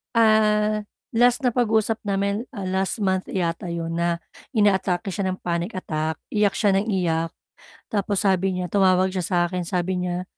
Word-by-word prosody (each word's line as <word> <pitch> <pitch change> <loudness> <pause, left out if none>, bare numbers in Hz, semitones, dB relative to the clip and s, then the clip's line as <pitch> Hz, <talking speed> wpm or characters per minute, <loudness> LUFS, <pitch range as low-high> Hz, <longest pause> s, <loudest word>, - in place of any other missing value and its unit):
Ah, 215 -1 +4 0.3
last 245 +3 +3
na 250 - +3
pag-usap 225 -2 +1
namin, 200 +4 -1
ah, 200 - -5
last 190 +3 -1
month 190 -1 0
yata 175 -1 -2
'yon 170 0 -3
na 170 0 0 0.3
inaatake 195 -2 +2
siya 190 +1 -2
ng 185 0 -2
panic 170 +5 -2
attack, 160 -3 -2 0.2
iyak 210 -2 +2
siya 205 -3 +3
nang 195 +3 +1
iyak. 165 -5 0 0.6
Tapos 205 -1 0
sabi 190 -1 +2
niya, 180 -2 -3
tumawag 190 -1 +3
siya 185 - -2
sa 180 - 0
akin, 180 0 -3
sabi 180 0 -1
niya, 180 0 -2
190 Hz, 170 wpm, -23 LUFS, 180-210 Hz, 0.6 s, Ah